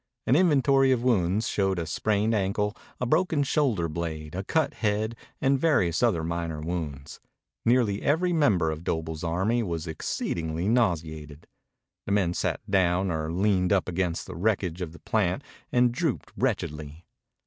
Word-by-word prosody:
An 125 Hz, -, +3 dB
inventory 135 Hz, -5 st, +4 dB
of 125 Hz, -2 st, +1 dB
wounds 105 Hz, -3 st, +2 dB
showed 95 Hz, -2 st, 0 dB
a 85 Hz, -, -2 dB
sprained 105 Hz, +6 st, 0 dB
ankle, 105 Hz, +1 st, 0 dB, 0.2 s
a 125 Hz, -, -1 dB
broken 155 Hz, +2 st, +2 dB
shoulder 130 Hz, -, +1 dB
blade, 80 Hz, -1 st, -5 dB
a 95 Hz, +2 st, -3 dB
cut 155 Hz, +8 st, 0 dB
head, 110 Hz, +1 st, -1 dB, 0.2 s
and 135 Hz, 0 st, +2 dB
various 125 Hz, -, +2 dB
other 105 Hz, -10 st, +2 dB
minor 85 Hz, -1 st, -3 dB
wounds. 75 Hz, -4 st, -5 dB, 0.5 s
Nearly 115 Hz, -4 st, +2 dB
every 175 Hz, +5 st, +1 dB
member 100 Hz, -, +3 dB
of 80 Hz, +1 st, -6 dB
Doble's 80 Hz, -1 st, -3 dB
army 95 Hz, +8 st, +1 dB
was 85 Hz, -6 st, -3 dB
exceedingly 80 Hz, +1 st, -3 dB
nauseated. 80 Hz, -9 st, -1 dB, 0.6 s
The 100 Hz, -, 0 dB
men 95 Hz, -4 st, +2 dB
sat -, -, -1 dB
down 95 Hz, -1 st, +2 dB
or 80 Hz, -1 st, -2 dB
leaned 95 Hz, 0 st, +1 dB
up 100 Hz, -3 st, +2 dB
against 90 Hz, -1 st, -1 dB
the -, -, -8 dB
wreckage 95 Hz, -2 st, -1 dB
of 85 Hz, -3 st, -4 dB
the 85 Hz, -, -12 dB
plant 105 Hz, +3 st, 0 dB, 0.3 s
and 125 Hz, -2 st, +4 dB
drooped 135 Hz, +2 st, -2 dB
wretchedly. 80 Hz, -, -3 dB
95 Hz, 155 wpm, -27 LUFS, 85-120 Hz, 0.6 s, inventory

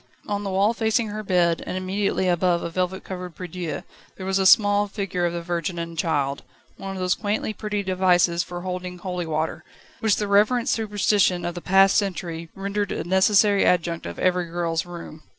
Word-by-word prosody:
On 205 Hz, -1 st, -2 dB
the 200 Hz, -, -3 dB
wall 195 Hz, +4 st, +2 dB
facing 220 Hz, -1 st, 0 dB
her 210 Hz, +1 st, -4 dB
bed, 175 Hz, -4 st, +2 dB
and 185 Hz, -, -3 dB
immediately 190 Hz, 0 st, -1 dB
above 175 Hz, 0 st, +2 dB
a 170 Hz, -, -4 dB
velvet 185 Hz, +2 st, -2 dB
covered 180 Hz, -3 st, -7 dB
prie 180 Hz, -, -6 dB
dieu, 165 Hz, -4 st, -5 dB, 0.3 s
there 185 Hz, -, -7 dB
was 190 Hz, 0 st, +1 dB
a 190 Hz, -, +4 dB
small 205 Hz, 0 st, +5 dB
figure 195 Hz, -4 st, -2 dB
of 170 Hz, -, -3 dB
the 170 Hz, 0 st, -4 dB
Virgin 175 Hz, 0 st, -3 dB
and 170 Hz, 0 st, -5 dB
Child 145 Hz, -4 st, -1 dB, 0.3 s
one 195 Hz, 0 st, -6 dB
of -, -, -6 dB
those 180 Hz, 0 st, +2 dB
quaintly 210 Hz, +1 st, -2 dB
pretty 210 Hz, -1 st, -3 dB
devices 180 Hz, -2 st, +2 dB
for 175 Hz, 0 st, -6 dB
holding 180 Hz, 0 st, -5 dB
holy 180 Hz, -2 st, -4 dB
water, 160 Hz, +1 st, -2 dB, 0.4 s
which 220 Hz, -3 st, +2 dB
the 210 Hz, -, -2 dB
reverent 215 Hz, +5 st, +3 dB
superstition 205 Hz, -4 st, +1 dB
of 175 Hz, -, -2 dB
the 175 Hz, -, -7 dB
past 195 Hz, +2 st, +5 dB
century 170 Hz, -4 st, -2 dB
rendered 200 Hz, +1 st, -2 dB
a -, -, -2 dB
necessary 195 Hz, +3 st, +4 dB
adjunct 170 Hz, -, +1 dB
of 85 Hz, -, -7 dB
every 180 Hz, -1 st, +1 dB
girl's 165 Hz, 0 st, -2 dB
room. 170 Hz, -3 st, -9 dB
185 Hz, 195 wpm, -24 LUFS, 175-200 Hz, 0.4 s, small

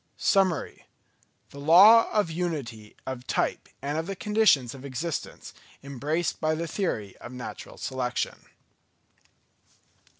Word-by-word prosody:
_Summary: 190 Hz, -6 st, +1 dB, 0.7 s
the 140 Hz, -, -10 dB
Law 195 Hz, +10 st, +7 dB
of 205 Hz, -6 st, +1 dB
Unity 140 Hz, -11 st, -4 dB
of 130 Hz, -1 st, -6 dB
Type -, -, -1 dB
and 145 Hz, +3 st, -1 dB
of 165 Hz, -, -4 dB
the 195 Hz, -, -4 dB
Conditions 210 Hz, -, +3 dB
of 135 Hz, -1 st, -11 dB
Existence 140 Hz, +4 st, -5 dB, 0.3 s
embraced 145 Hz, +5 st, -2 dB
by 155 Hz, 0 st, +1 dB
the 165 Hz, +2 st, -3 dB
Theory 115 Hz, -, -3 dB
of 120 Hz, -, -10 dB
Natural 125 Hz, -1 st, -8 dB
Selection. 125 Hz, -2 st, -3 dB
155 Hz, 120 wpm, -27 LUFS, 130-180 Hz, 0.7 s, Law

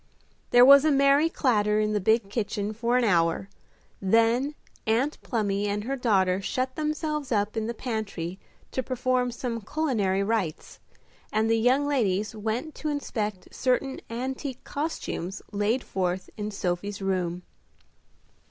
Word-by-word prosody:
There 245 Hz, 0 st, +7 dB
was 280 Hz, +1 st, +9 dB
a 310 Hz, -, +4 dB
merry 280 Hz, +3 st, +4 dB
clatter 210 Hz, -9 st, +2 dB
in 215 Hz, 0 st, +1 dB
the 210 Hz, -, +2 dB
big 220 Hz, +2 st, +2 dB
kitchen 210 Hz, -1 st, -2 dB
for 235 Hz, +3 st, +1 dB
an 250 Hz, -, +2 dB
hour; 175 Hz, -2 st, +2 dB, 0.5 s
then 230 Hz, +8 st, +3 dB, 0.3 s
Aunt 250 Hz, +7 st, +1 dB
Plumy 205 Hz, -3 st, -1 dB
and 205 Hz, 0 st, -1 dB
her 270 Hz, +5 st, -2 dB
daughter 195 Hz, -7 st, +2 dB
shut 255 Hz, +6 st, -2 dB
themselves 305 Hz, -2 st, -2 dB
up 205 Hz, -1 st, +1 dB
in 220 Hz, -1 st, -1 dB
the 235 Hz, -, -3 dB
pantry 200 Hz, -7 st, -4 dB, 0.3 s
to 260 Hz, -, -1 dB
perform 255 Hz, 0 st, 0 dB
some 240 Hz, -1 st, -4 dB
culinary 215 Hz, -8 st, 0 dB
rites, 200 Hz, -7 st, -2 dB, 0.5 s
and 220 Hz, +1 st, +1 dB
the 225 Hz, -, +3 dB
young 260 Hz, +5 st, +3 dB
ladies 210 Hz, -7 st, 0 dB
went 225 Hz, +8 st, -3 dB
to 310 Hz, -, -4 dB
inspect 215 Hz, -9 st, -3 dB
certain 260 Hz, +1 st, 0 dB
antique 260 Hz, +2 st, -4 dB
costumes 280 Hz, -, -4 dB
laid 210 Hz, +5 st, 0 dB
forth 185 Hz, -1 st, -2 dB
in 210 Hz, 0 st, -4 dB
Sophie's 195 Hz, 0 st, -3 dB
room. 180 Hz, -2 st, -1 dB
225 Hz, 145 wpm, -27 LUFS, 200-260 Hz, 0.5 s, was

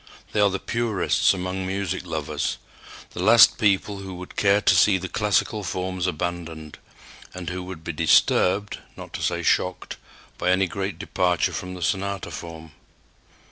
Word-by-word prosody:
They 105 Hz, -, -1 dB
are 100 Hz, -, +5 dB
the 95 Hz, -, -2 dB
purists 115 Hz, -2 st, +1 dB
among 95 Hz, 0 st, -3 dB
music 95 Hz, -1 st, -3 dB
lovers, 75 Hz, -2 st, -2 dB, 0.5 s
the 90 Hz, -, -6 dB
last 115 Hz, +4 st, +7 dB
people 100 Hz, -1 st, +1 dB
who 95 Hz, -1 st, -7 dB
would 90 Hz, +1 st, -10 dB
care 100 Hz, 0 st, +3 dB
to -, -, +4 dB
see 100 Hz, -3 st, +5 dB
the 95 Hz, 0 st, -5 dB
classical 105 Hz, +2 st, 0 dB
forms 95 Hz, -1 st, -3 dB
abandoned, 85 Hz, -2 st, -5 dB, 0.6 s
and 90 Hz, -1 st, -5 dB
who 90 Hz, 0 st, -4 dB
would 90 Hz, -3 st, -9 dB
be 85 Hz, -, -3 dB
disturbed, 90 Hz, +5 st, +2 dB, 0.2 s
not -, -, -10 dB
to -, -, -5 dB
say -, -, -1 dB
shocked, 90 Hz, 0 st, 0 dB, 0.4 s
by -, -, 0 dB
any 95 Hz, +1 st, +3 dB
great 95 Hz, +2 st, -4 dB
departure 90 Hz, -2 st, 0 dB
from 90 Hz, 0 st, -5 dB
the 90 Hz, -, -6 dB
sonata 100 Hz, +1 st, -2 dB
form. 80 Hz, -1 st, -9 dB
95 Hz, 160 wpm, -24 LUFS, 90-100 Hz, 0.6 s, last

